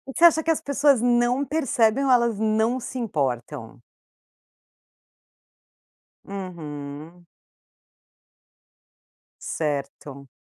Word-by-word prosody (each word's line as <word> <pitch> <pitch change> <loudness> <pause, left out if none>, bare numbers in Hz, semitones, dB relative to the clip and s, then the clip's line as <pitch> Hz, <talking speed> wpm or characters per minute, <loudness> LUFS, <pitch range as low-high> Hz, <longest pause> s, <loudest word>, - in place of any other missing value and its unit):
Você - - 0
acha 325 -2 +7
que 325 - -4
as 320 0 +1
pessoas 280 -3 +2
não 245 +2 +2
percebem 270 -4 +1
ou - - +1
elas 235 -4 +3
não 220 +3 +1
se 255 - -7
importam? 130 - -3 2.5
Uhum. 165 -3 -8 2.2
Certo. 140 -2 -4
220 Hz, 80 wpm, -24 LUFS, -, 2.5 s, acha